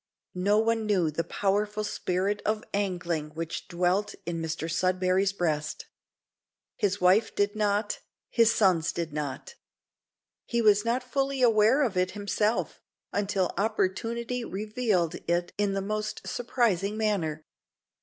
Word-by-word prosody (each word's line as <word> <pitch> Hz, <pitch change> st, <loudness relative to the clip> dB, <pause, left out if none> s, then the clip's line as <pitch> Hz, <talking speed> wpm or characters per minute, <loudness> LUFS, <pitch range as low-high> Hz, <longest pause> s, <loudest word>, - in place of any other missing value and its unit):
No 200 Hz, +3 st, +2 dB
one 225 Hz, 0 st, +1 dB
knew 180 Hz, -7 st, +2 dB
the 165 Hz, +3 st, -1 dB
powerful 210 Hz, +3 st, 0 dB
spirit 195 Hz, 0 st, -1 dB
of 215 Hz, 0 st, 0 dB
angling 175 Hz, -6 st, -2 dB
which 165 Hz, 0 st, -4 dB
dwelt 180 Hz, +3 st, 0 dB
in 165 Hz, -1 st, -3 dB
Mr 160 Hz, 0 st, -3 dB
Sudberry's 185 Hz, +3 st, +1 dB
breast. 155 Hz, -6 st, -2 dB, 0.9 s
His 205 Hz, 0 st, 0 dB
wife 190 Hz, +5 st, +3 dB
did 205 Hz, +1 st, +1 dB
not, 210 Hz, 0 st, 0 dB, 0.3 s
his 230 Hz, -1 st, +5 dB
sons 185 Hz, -8 st, +3 dB
did 165 Hz, -3 st, -3 dB
not. 145 Hz, -, -4 dB, 0.9 s
He 235 Hz, -, 0 dB
was 210 Hz, -2 st, +5 dB
not 240 Hz, +2 st, 0 dB
fully 270 Hz, +1 st, -1 dB
aware 230 Hz, +4 st, +5 dB
of 215 Hz, -8 st, -1 dB
it 180 Hz, 0 st, +2 dB
himself, 210 Hz, +2 st, -1 dB, 0.3 s
until 200 Hz, -2 st, 0 dB
opportunity 230 Hz, +4 st, -1 dB
revealed 210 Hz, -5 st, -1 dB
it 175 Hz, +1 st, 0 dB
in 205 Hz, -1 st, +1 dB
the 195 Hz, 0 st, -1 dB
most 215 Hz, +1 st, -3 dB
surprising 215 Hz, -5 st, 0 dB
manner. 170 Hz, -8 st, -1 dB
200 Hz, 130 wpm, -28 LUFS, 180-215 Hz, 0.9 s, his